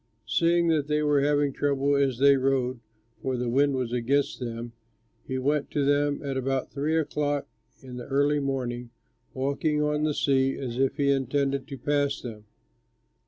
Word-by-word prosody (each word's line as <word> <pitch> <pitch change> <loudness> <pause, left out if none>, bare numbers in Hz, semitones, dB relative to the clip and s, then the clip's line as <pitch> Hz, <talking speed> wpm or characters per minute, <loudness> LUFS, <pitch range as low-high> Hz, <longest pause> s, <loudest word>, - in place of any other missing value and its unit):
Seeing 170 +6 +2
that 150 -3 +1
they 150 0 +1
were 145 -1 +3
having 145 -1 +2
trouble 140 0 +1
as 135 -3 +1
they 140 +2 +6
rowed, 130 -2 0 0.4
for 130 -1 -2
the 125 0 -2
wind 140 +3 +2
was 125 -2 -2
against 135 +4 0
them, 120 -1 -5 0.5
he 130 - -2
went 145 +3 0
to 145 -2 0
them 145 +1 +1
at 135 -2 -3
about 130 0 -1
three 150 +3 0
o'clock 145 -2 -1 0.4
in 125 -1 -9
the 125 - -7
early 145 +2 +2
morning, 125 -3 -3 0.5
walking 140 +3 0
on 150 0 0
the 150 -1 0
sea 135 -1 +2
as 125 -2 -4
if 135 0 +1
he 140 -1 +2
intended 135 0 0
to 140 -3 -7
pass 145 +2 0
them. 110 -4 -9
140 Hz, 170 wpm, -26 LUFS, 130-145 Hz, 0.5 s, they